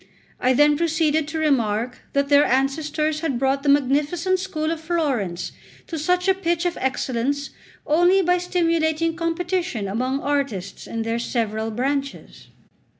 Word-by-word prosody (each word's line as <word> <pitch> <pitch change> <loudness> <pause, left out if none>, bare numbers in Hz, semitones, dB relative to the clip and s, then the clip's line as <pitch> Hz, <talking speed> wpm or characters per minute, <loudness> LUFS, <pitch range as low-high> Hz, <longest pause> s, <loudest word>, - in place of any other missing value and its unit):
I 255 +1 +3
then 295 +2 +4
proceeded 315 -2 +1
to 315 +1 -4
remark 250 -5 0
that 280 0 +1
their 285 0 +6
ancestors 300 +4 0
had 310 -6 -1
brought 270 +2 +1
the 285 - 0
magnificent 295 +7 +2
school 325 -4 -2
of 330 -1 -4
Florence 275 - -1 0.3
to 325 - -5
such 360 +4 +1
a 385 - +5
pitch 345 -2 -1
of 350 - 0
excellence 265 +2 -1 0.3
only 350 +5 +4
by 360 +1 +2
stimulating 330 -2 0
competition 335 - -2
among 255 +7 -1
artists 270 -10 -2
in 230 0 -3
their 230 +1 -1
several 225 -2 -2
branches. 275 +5 -3
295 Hz, 145 wpm, -22 LUFS, 255-330 Hz, 0.3 s, their